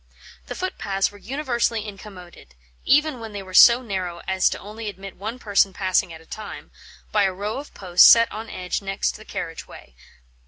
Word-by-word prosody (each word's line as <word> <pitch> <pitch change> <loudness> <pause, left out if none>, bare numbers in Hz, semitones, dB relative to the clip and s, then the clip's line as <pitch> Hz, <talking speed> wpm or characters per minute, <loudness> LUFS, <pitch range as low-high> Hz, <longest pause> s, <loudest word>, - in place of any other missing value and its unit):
The - - -6
footpaths 200 - -2
were 205 - -15
universally 235 -3 -2
incommoded 185 - -12 0.3
even 295 -2 +2
when 225 -2 -8
they 200 -1 -6
were 185 -1 -12
so 235 +6 +8
narrow 185 -6 -4
as 190 0 +2
only 215 +2 -9
to - - -2
admit 195 -1 -10
one 220 +5 -6
person 200 -4 +2
passing 185 -2 0
at 160 - -10
a 160 - -19
time 215 +4 -9 0.4
by 210 -2 +3
a 190 - +1
row 205 +6 -4
of 290 - -10
posts 180 -2 +6
set 230 0 +7
on 220 +2 -7
edge 180 +1 -4
next 195 0 -2
the 215 - -11
carriage 165 -1 -6
way. 65 - -14
205 Hz, 190 wpm, -23 LUFS, 185-230 Hz, 0.4 s, so